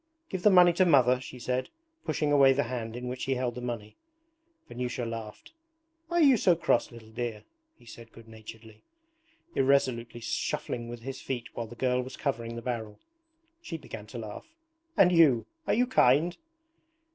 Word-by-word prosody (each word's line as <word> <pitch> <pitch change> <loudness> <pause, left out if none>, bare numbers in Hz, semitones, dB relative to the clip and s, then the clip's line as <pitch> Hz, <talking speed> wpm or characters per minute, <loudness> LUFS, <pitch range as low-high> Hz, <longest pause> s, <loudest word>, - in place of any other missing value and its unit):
'Give 185 - -4
the 210 - +6
money 180 -2 +7
to 185 - +3
Mother,' 130 -6 +4
she 130 - -9
said, 125 +1 -2 0.4
pushing 150 -1 0
away 135 -2 +6
the 140 +2 +1
hand 115 -2 -5
in 125 +1 -5
which 125 +1 -4
he 135 - 0
held 125 -1 -1
the 125 - -7
money. 115 -4 -6 0.7
Vanyusha 125 0 -4
laughed. 115 - -7 0.6
'Why 345 +1 -2
are 340 - +5
you 270 -4 +6
so 180 -4 +4
cross, 140 -7 +1
little 115 -2 -13
dear?' 115 -2 -4 0.3
he - - -21
said 115 0 -12
good 115 0 -15
naturedly, 110 0 -12 0.7
irresolutely 125 -4 +1
shuffling 120 +1 -3
with 120 -1 -8
his 135 +2 -7
feet 120 -3 -4
while 115 - -4
the 120 - -11
girl 125 +1 +1
was 130 +1 -8
covering 115 -4 -3
the 115 - -7
barrel. 110 -4 -4 0.6
She 165 - -6
began 110 -8 -9
to 120 - -9
laugh. 110 - -8 0.5
'And 180 - +6
you! 155 -9 +5 0.2
Are - - +2
you 245 +3 +3
kind?' 170 - +3
125 Hz, 180 wpm, -29 LUFS, 115-140 Hz, 0.7 s, money